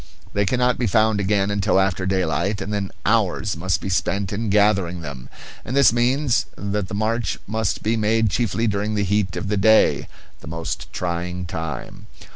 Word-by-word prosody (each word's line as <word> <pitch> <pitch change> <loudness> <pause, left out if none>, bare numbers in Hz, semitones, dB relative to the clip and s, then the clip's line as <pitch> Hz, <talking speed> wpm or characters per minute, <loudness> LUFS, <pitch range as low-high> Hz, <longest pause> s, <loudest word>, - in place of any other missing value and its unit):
They 100 -1 +1
cannot 125 +1 +1
be 120 - +1
found 110 +1 +3
again 100 0 +1
until 100 0 +2
after 95 -1 0
daylight, 95 +1 0
and 105 - -4
then 100 -2 -2 0.2
hours 105 -3 +1
must 85 -1 -1
be - - -4
spent 95 +2 -1
in 110 +1 -2
gathering 100 -4 +2
them; 70 -4 -8 0.3
and 125 - -4
this 135 -5 +6
means 125 +2 +1
that 100 -1 -3
the 100 - -5
march 110 +2 -1
must 110 0 -2
be 110 +2 +1
made 110 -1 +2
chiefly 115 -1 0
during 105 0 -1
the 105 - +1
heat 100 -1 0
of 100 - -3
the 105 +1 0
day, 110 +3 +4 0.3
the - - -12
most 80 +1 -5
trying 90 +1 -3
time. 80 -3 -6
100 Hz, 180 wpm, -22 LUFS, 90-110 Hz, 0.3 s, this